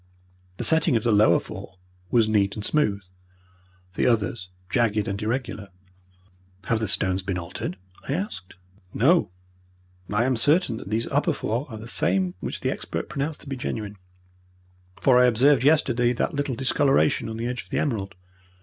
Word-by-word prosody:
The -, -, -3 dB
setting 160 Hz, -5 st, +3 dB
of 110 Hz, -, +1 dB
the 120 Hz, -, +2 dB
lower 105 Hz, -5 st, +5 dB
four 95 Hz, -, -10 dB, 0.3 s
was 115 Hz, -3 st, +3 dB
neat 100 Hz, -2 st, +1 dB
and 105 Hz, -, -5 dB
smooth. 105 Hz, -10 st, +1 dB, 0.9 s
The -, -, +1 dB
others 110 Hz, -4 st, 0 dB, 0.2 s
jagged 105 Hz, +1 st, +1 dB
and 100 Hz, +1 st, -3 dB
irregular. 110 Hz, -3 st, -3 dB, 0.9 s
"Have 115 Hz, +3 st, 0 dB
the 110 Hz, -, -1 dB
stones 95 Hz, -1 st, +2 dB
been 95 Hz, -1 st, -3 dB
altered?" 90 Hz, +1 st, -5 dB, 0.3 s
I -, -, +1 dB
asked. 155 Hz, -, -5 dB, 0.4 s
"No, 165 Hz, -, +3 dB, 0.8 s
I 105 Hz, +3 st, +2 dB
am 130 Hz, -1 st, +1 dB
certain 145 Hz, -2 st, +2 dB
that 95 Hz, -, -9 dB
these 110 Hz, +2 st, 0 dB
upper 145 Hz, +4 st, +1 dB
four 125 Hz, +2 st, -3 dB
are 110 Hz, -, -7 dB
the 110 Hz, -, -9 dB
same 95 Hz, -5 st, 0 dB
which -, -, -5 dB
the -, -, 0 dB
expert -, -, -5 dB
pronounced 145 Hz, +2 st, -3 dB
to -, -, -13 dB
be 135 Hz, -, -3 dB
genuine, 105 Hz, -5 st, -5 dB, 1.0 s
for 125 Hz, -2 st, +5 dB
I 125 Hz, -, +6 dB
observed 125 Hz, +2 st, +4 dB
yesterday 125 Hz, -5 st, +3 dB
that 125 Hz, -, -1 dB
little 145 Hz, -3 st, -2 dB
discoloration 135 Hz, -, +2 dB
on 110 Hz, -, -5 dB
the 115 Hz, -, -3 dB
edge 125 Hz, 0 st, -3 dB
of -, -, -23 dB
the -, -, -2 dB
emerald. 100 Hz, -9 st, -2 dB
115 Hz, 170 wpm, -24 LUFS, 105-135 Hz, 1.0 s, I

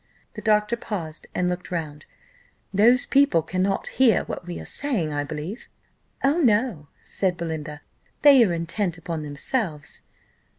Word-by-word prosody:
The -, -, -8 dB
doctor 210 Hz, 0 st, +2 dB
paused 170 Hz, -9 st, -5 dB
and 180 Hz, -, +1 dB
looked 180 Hz, 0 st, -3 dB
round. 155 Hz, -4 st, -5 dB, 0.7 s
"Those 240 Hz, +7 st, +5 dB
people 275 Hz, -, +3 dB
cannot 185 Hz, +3 st, -1 dB
hear 250 Hz, -6 st, +3 dB
what 175 Hz, -, -7 dB
we 175 Hz, -, -5 dB
are -, -, -8 dB
saying, 215 Hz, -, 0 dB
I 145 Hz, 0 st, -1 dB
believe?" 155 Hz, -, -6 dB, 0.6 s
"Oh, 280 Hz, +5 st, +3 dB
no," 215 Hz, -, +2 dB, 0.2 s
said 185 Hz, -3 st, -1 dB
Belinda, 155 Hz, -3 st, -5 dB, 0.4 s
"they 280 Hz, -4 st, +8 dB
are 200 Hz, -, +1 dB
intent 170 Hz, +2 st, -2 dB
upon 165 Hz, -1 st, -5 dB
themselves." 150 Hz, -, -3 dB
180 Hz, 140 wpm, -24 LUFS, 160-230 Hz, 0.7 s, they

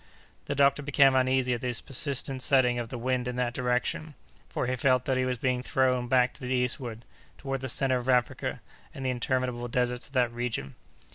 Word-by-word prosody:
The 145 Hz, -, -3 dB
doctor 140 Hz, 0 st, +3 dB
became 140 Hz, -1 st, +4 dB
uneasy 130 Hz, -1 st, +2 dB
at 120 Hz, -, -3 dB
this 125 Hz, -2 st, -1 dB
persistent 135 Hz, -1 st, -2 dB
setting 125 Hz, -3 st, +3 dB
of 115 Hz, -1 st, -5 dB
the 125 Hz, -, -5 dB
wind 125 Hz, +1 st, -1 dB
in 125 Hz, -, -3 dB
that 125 Hz, -1 st, -1 dB
direction, 125 Hz, +5 st, -1 dB, 0.3 s
for -, -, -2 dB
he 125 Hz, +1 st, -1 dB
felt 130 Hz, 0 st, +2 dB
that 135 Hz, -, +1 dB
he 130 Hz, 0 st, +1 dB
was 125 Hz, -1 st, -1 dB
being 125 Hz, +1 st, 0 dB
thrown 125 Hz, -1 st, +1 dB
back 125 Hz, 0 st, +3 dB
to -, -, -15 dB
the 125 Hz, -, -5 dB
eastward, 120 Hz, -2 st, 0 dB, 0.3 s
toward 135 Hz, -1 st, -4 dB
the 130 Hz, -, -3 dB
centre 130 Hz, +1 st, +2 dB
of 125 Hz, +1 st, -4 dB
Africa, 125 Hz, -3 st, 0 dB, 0.3 s
and 135 Hz, -, -6 dB
the 130 Hz, -, +1 dB
interminable 125 Hz, -1 st, -1 dB
deserts 125 Hz, +1 st, -1 dB
of -, -, -20 dB
that 125 Hz, -3 st, +2 dB
region. 115 Hz, -, -3 dB
125 Hz, 205 wpm, -28 LUFS, 125-130 Hz, 0.3 s, became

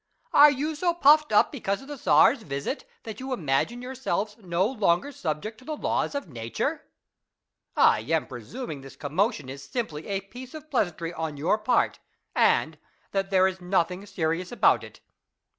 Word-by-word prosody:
Are 295 Hz, +1 st, +9 dB
you 290 Hz, +3 st, -1 dB
so 340 Hz, +3 st, 0 dB
puffed 305 Hz, -1 st, +5 dB
up -, -, +4 dB
because 210 Hz, -5 st, -3 dB
of -, -, -13 dB
the 290 Hz, -, -6 dB
Czar's 260 Hz, -1 st, +4 dB
visit,'^ 140 Hz, -, -4 dB, 0.2 s
that 220 Hz, -2 st, -7 dB
you 265 Hz, +1 st, -6 dB
imagine 190 Hz, -, -1 dB
yourselves 250 Hz, -5 st, -2 dB
no 180 Hz, -2 st, 0 dB
longer 215 Hz, 0 st, +1 dB
subject 195 Hz, -, -4 dB
to -, -, -17 dB
the 310 Hz, +3 st, -4 dB
laws -, -, -1 dB
of 280 Hz, -, -3 dB
Nature? 115 Hz, -6 st, -3 dB, 0.9 s
I -, -, +5 dB
am -, -, 0 dB
presum 230 Hz, -, -7 dB
ing 140 Hz, -3 st, -7 dB
this 135 Hz, 0 st, -12 dB
commotion 165 Hz, -, -1 dB
is 135 Hz, +1 st, -7 dB
simply 160 Hz, -, -4 dB
a 195 Hz, -1 st, -1 dB
piece 245 Hz, +8 st, -11 dB
of 310 Hz, 0 st, -11 dB
pleasantry 175 Hz, -, -1 dB
on 160 Hz, -3 st, -4 dB
your 170 Hz, +9 st, +1 dB
part, 215 Hz, +4 st, +1 dB, 0.4 s
and -, -, +2 dB, 0.3 s
that, 195 Hz, -1 st, -1 dB
there 190 Hz, -1 st, +4 dB
is 190 Hz, 0 st, -4 dB
nothing 180 Hz, +1 st, 0 dB
serious 165 Hz, 0 st, -2 dB
about 245 Hz, -, +3 dB
it. -, -, -13 dB
200 Hz, 175 wpm, -26 LUFS, 165-260 Hz, 0.9 s, Are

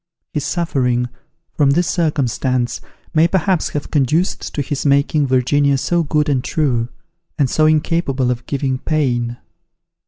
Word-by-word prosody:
His 150 Hz, -, -1 dB
suffering, 130 Hz, -7 st, 0 dB, 0.4 s
from 145 Hz, -3 st, +3 dB
this 170 Hz, +5 st, +2 dB
circumstance, 130 Hz, -6 st, 0 dB, 0.3 s
may 160 Hz, +1 st, +5 dB
perhaps 185 Hz, -1 st, +1 dB
have 145 Hz, -, -5 dB
conduced 155 Hz, +5 st, +1 dB
to 145 Hz, -, 0 dB
his 145 Hz, 0 st, -3 dB
making 140 Hz, +1 st, +2 dB
Virginia 140 Hz, +2 st, +2 dB
so 175 Hz, +6 st, +1 dB
good 150 Hz, -1 st, 0 dB
and 135 Hz, -4 st, +1 dB
true, 125 Hz, -8 st, 0 dB, 0.5 s
and 140 Hz, -, +3 dB
so 155 Hz, +5 st, +2 dB
incapable 150 Hz, -4 st, +1 dB
of 125 Hz, 0 st, -5 dB
giving 135 Hz, -2 st, -1 dB
pain. 120 Hz, -6 st, -1 dB
140 Hz, 135 wpm, -18 LUFS, 130-155 Hz, 0.5 s, may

